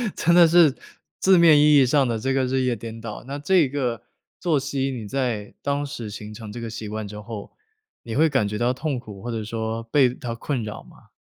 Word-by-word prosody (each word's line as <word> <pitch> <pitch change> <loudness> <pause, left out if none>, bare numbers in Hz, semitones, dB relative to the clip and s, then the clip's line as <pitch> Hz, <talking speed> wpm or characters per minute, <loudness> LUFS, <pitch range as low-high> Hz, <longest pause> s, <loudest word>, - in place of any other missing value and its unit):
真 170 - +2
的 170 -2 +8
是 160 -4 +5 0.4
字 190 -1 +5
面 165 -3 +7
意 150 0 +6
义 135 - +6
上 135 +1 +3
的 115 -2 -1
这 130 +4 -1
个 135 -1 +1
日 130 +1 0
夜 125 -2 +1
颠 115 +1 -8
倒。 105 -2 -7
那 140 +1 -4
这 170 -1 +3
个 125 -5 -2 0.4
作 160 -5 +1
息 135 0 -2
你 115 -5 -6
在 120 -5 -2
当 145 0 -1
时 120 -7 -6
形 105 +1 -8
成 110 -1 -9
这 120 - -7
个 115 - -5
习 110 -1 -6
惯 110 0 -4
之 105 +1 -8
后， 105 -1 -8 0.5
你 115 -1 -6
会 160 +3 +4
感 130 -7 +1
觉 105 +1 -4
到 120 +2 +1
痛 135 -1 -3
苦 105 -5 -11
或 120 - -5
者 110 -2 -3
说 110 +1 -4
被 125 +1 +3
它 120 -2 -6
困 125 -1 -3
扰 105 - -7
吗？ - - -20
125 Hz, 250 characters per minute, -23 LUFS, 110-140 Hz, 0.5 s, 的